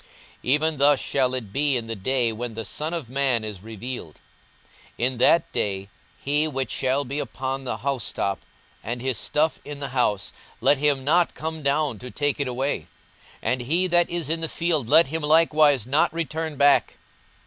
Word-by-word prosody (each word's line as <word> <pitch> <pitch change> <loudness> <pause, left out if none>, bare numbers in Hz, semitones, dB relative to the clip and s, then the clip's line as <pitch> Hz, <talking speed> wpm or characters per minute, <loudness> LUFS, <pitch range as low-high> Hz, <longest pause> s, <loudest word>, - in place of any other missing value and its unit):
42:017:030 - - -28 0.3
Even 150 +4 +1
thus 140 0 +4
shall 130 -2 0
it 110 -6 -6
be 140 -2 +1
in 115 - -4
the 115 0 -4
day 120 +3 0
when 115 0 -5
the 115 0 -4
Son 155 - -3
of 165 -7 -4
man 130 -3 0
is 105 -4 -6
revealed. 110 -5 -7 0.8
42:017:031 120 - +1
In 130 -1 0
that 165 +6 +4
day, 100 -1 -2 0.3
he 145 +2 +1
which 135 -3 -2
shall 135 +2 0
be 140 +4 -3
upon 135 +1 -4
the 115 - -2
housetop, 115 -6 -2 0.4
and 120 +3 -3
his 130 -2 -1
stuff 155 +2 0
in 145 -1 -7
the 140 -1 -4
house, 115 -6 0 0.3
let 145 - +3
him 140 -2 +2
not 170 +5 +2
come 160 0 -5
down 140 -4 0
to 125 - -8
take 145 +2 -1
it 140 - 0
away: 130 +3 -2 0.6
and 125 0 0
he 165 +9 +1
that 175 -1 +3
is 170 -3 -1
in 165 +1 -1
the 160 - -2
field, 160 -8 -1
let 160 0 +6
him 160 +2 -3
likewise 150 -4 +4
not 140 +5 +2
return 160 -1 -3
back. 140 0 +3
135 Hz, 190 wpm, -24 LUFS, 120-150 Hz, 0.8 s, let